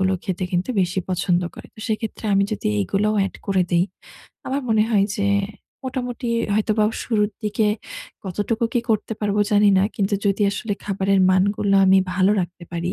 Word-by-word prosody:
গুলো 190 0 +2
খেতে 185 -2 -2
কিন্তু 180 +7 0
বেশি 180 +1 0
পছন্দ 180 -1 +1
করে। - - -11
তো - - -22
সেক্ষেত্রে 220 0 -3
আমি 195 0 +4
যদি 215 - -3
এগুলোও 205 - 0
এড - - -9
করে 190 -2 +2
দেই, 175 +1 +3 0.6
আমার 275 +2 -1
মনে 220 -1 +4
হয় 200 -3 +4
যে, 200 - -1 0.6
মোটামুটি 250 -1 -4 0.3
হয়তোবা 215 0 +2 0.2
শুরুর 210 -2 +1
দিকে 210 +1 0 0.6
কতটুকু 205 +5 -1
কি 240 - +3
করতে 220 +1 0
পারবো 210 0 +1
জানি 205 0 +5
না। 190 - +3
কিন্তু 200 -1 0
যদি 200 +1 +1
আসলে 205 +1 -3
খাবারের 195 -1 +1
মান 185 0 +4
গুলা 195 -1 +2
আমি 190 0 +6 0.2
ভালো 190 +2 +3
রাখতে 175 0 -8
পারি 175 +2 -2
200 Hz, 175 wpm, -22 LUFS, 190-215 Hz, 0.6 s, আমি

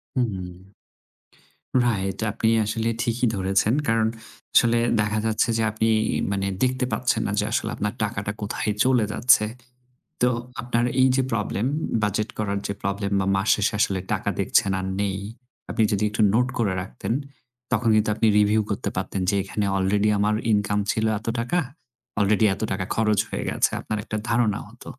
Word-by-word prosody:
হুম। 95 -6 -3 1.1
Right. 95 -5 -1
আপনি 110 +2 0 0.2
আসলে 110 +2 -1
ঠিকই 120 0 0
ধরেছেন। 95 +3 +1
কারণ 115 -1 +2 0.5
আসলে 115 0 +5 0.2
দেখা 105 +1 0
যাচ্ছে 110 +1 +1
যে 115 - +1
আপনি 110 +1 0 0.4
মানে 100 -1 -1 0.2
দেখতে 130 0 +1
পাচ্ছেন 120 -3 0
না - - -2
যে 105 - +1
আসলে - - 0
আপনার 105 +1 -2
টাকাটা 100 -2 -2
কোথায় 105 +1 -2
চলে 125 -4 +3
যাচ্ছে। 115 -3 +5 0.8
তো 125 - +5 0.3
আপনার 120 0 0 0.2
এই 130 - +6
যে 135 - +3
প্রবলেম 105 -1 -1 0.4
বাজেট 105 +2 0
করার 100 -2 -1
যে 100 - -2
প্রবলেম 100 0 -2
বা 95 - 0
মাস 95 +2 -1
শেষে 105 - 0
আসলে 95 -2 +2
টাকা - - -1
দেখছেন 100 - +2
আর 95 - -3 0.2
নেই। 100 -2 -1 0.5
আপনি 110 0 +1
যদি 105 0 0
একটু 105 +1 -2
নোট 125 +3 +3
করে 105 -6 +1
রাখতেন 110 +4 -4 0.6
তখন 115 -1 +2
কিন্তু 110 0 +2
আপনি 110 - +2
রিভিউ 105 +1 +3
করতে 100 +5 -2
পারতেন 95 +1 -2
যে 100 - +1
এখানে 100 +1 -2
আলরেডি 100 +2 +2
আমার 105 +1 +2 0.2
ইনকাম 105 -1 +1
ছিল 110 - -1
এত 110 - -14
টাকা। 125 +10 0 0.6
অলরেডি 105 +2 +3
এত - - -8
টাকা 95 -1 -2
খরচ 110 -2 +2
হয়ে - - -3
গেছে। - - +1
আপনার 110 - -3
একটা 105 -1 -4
ধারণা 115 -3 +2
হত। 120 +5 -15
105 Hz, 170 wpm, -24 LUFS, 100-115 Hz, 1.1 s, এই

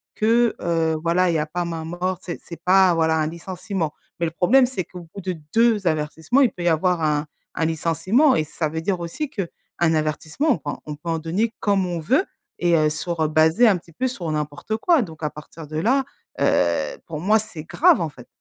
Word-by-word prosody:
Que, 230 +2 +3
heu, 165 -2 +1
voilà 175 +2 +2
il 170 - +1
y - - +2
a 150 - 0
pas 175 +3 -3
main 165 -2 -4
morte. 175 +2 -3
C'est 175 - -5
c'est 170 - -10
pas 185 -1 +5
voilà 160 -1 +2
un 155 -1 +1
licenciement. 175 0 -4 0.3
Mais 170 - +1
le 165 - -2
problème 240 +11 +4
c'est 245 -7 -3
qu'au 175 0 -11
bout 200 - -7
de 185 0 -3 0.2
2 225 -5 +3
avertissements, 160 - +1
il 255 - +4
peut 175 - -7
y - - +1
avoir 170 +1 +2
un 150 -1 +1 0.3
un 165 - 0
licenciement 165 - +2
et 155 - +1
ça 155 +1 -3
veut 160 +1 -4
dire 185 +1 -1
aussi 170 - -4
qu'un 200 - -3 0.3
avertissement 160 - 0
on 245 - +2
peut 150 - -6
en - - -8
on 150 - -5
peut 165 +3 -8
en 165 -1 0
donner 190 +8 -1
comme 200 -2 +2
on 175 -1 -3
veut 265 - +2 0.4
et 175 -1 +4
heu, 155 -1 +3
sur, 165 +2 -3
heu, - - +2
basé 160 +9 +4
un 200 -4 +4
petit 170 -1 -16
peu 260 - -1
sur 180 -9 -5
n'importe 150 +7 -3
quoi 325 +5 +3
donc 160 -7 -7
à 150 - 0
partir 150 +1 -11
de 155 +1 -5
là, 255 +11 +2 0.4
heu, 85 -3 +1
pour 155 -2 -6
moi 210 +5 +4
c'est 210 -8 -8
grave, 170 +2 +4
en 165 - -1
fait. 125 -4 -14
170 Hz, 230 wpm, -22 LUFS, 160-195 Hz, 0.4 s, pas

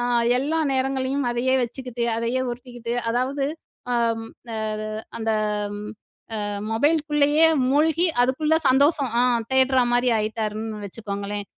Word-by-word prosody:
ஆ, - - -1 0.4
எல்லா 310 +5 0
நேரங்களையும் 265 0 0
அதையே 255 +2 +1
வச்சுக்கிட்டு, 245 0 -5
அதையே 230 +3 -1
உருட்டிக்கிட்டு 240 -1 -6 0.2
அதாவது, 260 +4 0 0.5
அம் 230 -1 0 0.5
அது 215 0 -4 0.3
அந்த 225 0 -1 1.1
அ - - -2 0.3
மொபைலுக்குள்ளேயே 295 +4 +3 0.2
மூழ்கி, 320 +4 +3 0.2
அதுக்குள்ள 305 +5 +1
சந்தோஷம் 280 -1 +3
ஆ - - +4 0.3
தேடுறமாரி 255 -2 +3
ஆயிட்டாருன்னு 215 0 -3
வச்சுக்கோங்களேன். 205 0 -5
250 Hz, 105 wpm, -23 LUFS, 230-280 Hz, 1.1 s, ஆ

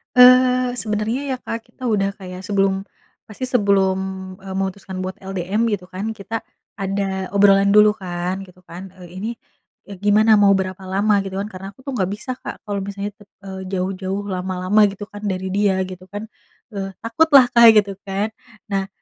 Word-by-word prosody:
Eee, 250 0 +6
sebenernya 220 +3 -2
ya, 255 - -1
Kak, 230 -2 -6
kita 255 -2 -6
udah 200 -3 +1
kayak 185 0 -8
sebelum 195 -1 +1 0.4
pasti 240 +4 -6
sebelum, 200 -6 +2 0.4
eee, 195 - -7
memutuskan 190 -1 -4
buat 185 0 -4
LDM 190 +3 -1
gitu 180 -3 -3
kan, 190 +4 -4
kita 220 +1 -5 0.3
ada 195 -1 -2
obrolan 200 0 +5
dulu 210 0 +6
kan, 180 0 -4
gitu 185 -1 -17
kan, 180 +3 -9
"Eee, 180 - -10
ini, 215 +5 -3 0.6
eee, 200 - -8
gimana 215 +2 +5
mau 205 -1 +5
berapa 190 0 -1
lama?" 200 +3 +1
Gitu 195 0 -5
kan. 200 - -3
Karena 190 -2 -9
aku 205 - -31
tuh 275 - -3
nggak 190 -5 0
bisa, 235 +5 -5
Kak, - - -8
kalau 200 -1 -2
misalnya, 200 +1 -5 0.4
eee, 190 0 -6
jauh-jauh 190 +1 -3
lama-lama 185 +2 +1
gitu 200 +1 -8
kan 205 0 -11
dari 190 -2 -2
dia 195 0 +1
gitu 185 -1 -9
kan. 205 +2 -6 0.5
Eee, 195 -1 -3
takutlah, 270 +3 +5
Kak, 235 -2 +8
gitu 205 -2 +3
kan. 200 +2 -2 0.4
Nah, 195 -1 -1
200 Hz, 175 wpm, -21 LUFS, 190-215 Hz, 0.6 s, Kak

